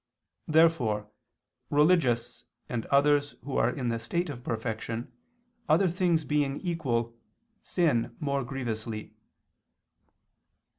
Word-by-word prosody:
Therefore 140 -11 +3 0.6
religious 145 -6 +2 0.2
and 115 -2 -3
others 145 +1 +3
who 135 +1 -5
are - - +3
in 125 -3 -2
the 115 0 -1
state 170 +8 -2
of 125 -3 -9
perfection, 115 +1 -4 0.6
other 170 +5 +5
things 170 -3 +1
being 145 -1 0
equal, 120 -10 -1 0.5
sin 140 -10 +1
more 140 -2 -1
grievously. 115 -4 -5
135 Hz, 100 wpm, -28 LUFS, 115-155 Hz, 0.6 s, other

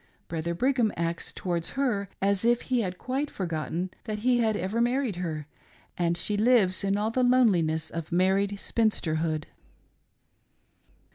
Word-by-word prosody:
Brother 170 +1 -2
Brigham 245 0 +2
acts 170 0 -2
towards 170 -2 -2
her 215 -8 0
as 200 0 +2
if 240 +1 +3
he 250 -2 +1
had 185 -3 -3
quite 270 +6 -2
forgotten 170 0 -3
that 215 -2 -3
he 250 -1 +4
had 220 -2 +2
ever 195 +6 -1
married 245 -4 0
her, 160 -4 -3 0.5
and 170 -1 0
she 205 +5 0
lives 210 -5 +4
in 200 0 +1
all 215 +2 0
the 255 - +1
loneliness 185 -11 +3
of 165 -1 -5
married 195 +3 +2
spinster 210 -10 0
hood. 155 -1 -1
195 Hz, 150 wpm, -27 LUFS, 170-235 Hz, 0.5 s, he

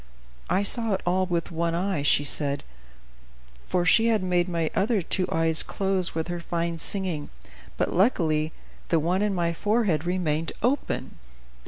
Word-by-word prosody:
"I 195 - +2
saw 225 0 +1
it - - -5
all 185 +1 +1
with 170 -2 -2
one 170 0 -1
eye," 185 -3 -1
she 145 0 +3
said; 140 -1 -1 1.0
"for 180 -1 0
she 225 +6 +5
had 220 -4 +2
made 180 -1 +1
my 165 -2 -1
other 205 -1 +1
two 185 +2 0
eyes 160 -1 +2
close 190 -3 -1
with 160 0 -2
her 175 0 -3
fine 170 -1 -2
singing, 175 -6 0 0.5
but - - 0
luckily 160 -6 +2 0.4
the 165 - +3
one 175 +5 0
in 205 -2 0
my 170 -1 0
forehead 205 -4 +1
remained 165 -3 -1
open." 265 +4 -1
175 Hz, 160 wpm, -26 LUFS, 165-195 Hz, 1.0 s, she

